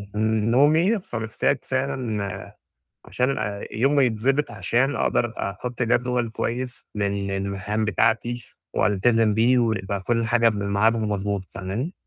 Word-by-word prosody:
نومي، 130 - +3
فمحتاج 110 - -1
فعلًا، 125 -7 -3 0.5
عشان 130 +2 0 0.4
يومي 135 +5 +3
يتضبط 130 +6 0
عشان 135 +3 0
أقدر 120 0 0
أحط 120 +6 -4
جدول 125 0 +1
كويس 125 +3 -4
لل 100 -1 -1
للمهام 100 +2 -2
بتاعتي، 115 +2 0 0.3
وألتزم 105 +3 +2
بيه، 115 +4 +3
ويبقى 100 -4 -1
كل 115 +3 0
حاجة 115 0 +2
قبل 105 -3 +3
الميعاد 100 +3 +2
المضبوط، 105 -2 -1
فاهماني؟ 105 - -3
115 Hz, 115 wpm, -24 LUFS, 105-125 Hz, 0.5 s, نومي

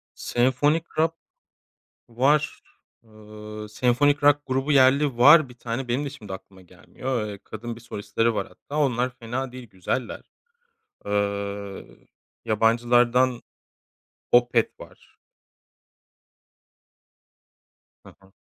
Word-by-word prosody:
Senfonik 140 +6 +1
rock 165 +1 +2 1.0
var. 140 +5 +1 0.4
Iıı, 105 -1 -11
senfonik 135 +6 +2
rock 145 0 +5
grubu 135 +3 -1
yerli 135 -1 +4
var 145 +2 +7
bir 125 - -15
tane. 120 +2 -4
Benim 130 +5 -1
de - - -3
şimdi 105 -9 -9
aklıma 95 0 -12
gelmiyor. 120 +5 -5
Eee, 100 -1 -8
kadın 115 +2 -7
bir 120 - -13
solistleri 115 +1 -1
var 100 -2 -3
hatta. 145 - -9
Onlar 130 -3 +1
fena 125 +3 -4
değil, 125 -3 -11
güzeller. 95 +7 -4 0.9
Iıı, 100 -1 -3 0.6
yabancılardan 120 +3 +2 0.9
Opeth 120 -1 +3
var. - - -15 2.9
Ha - - -15
ha. 95 0 -22
120 Hz, 105 wpm, -24 LUFS, 105-135 Hz, 2.9 s, var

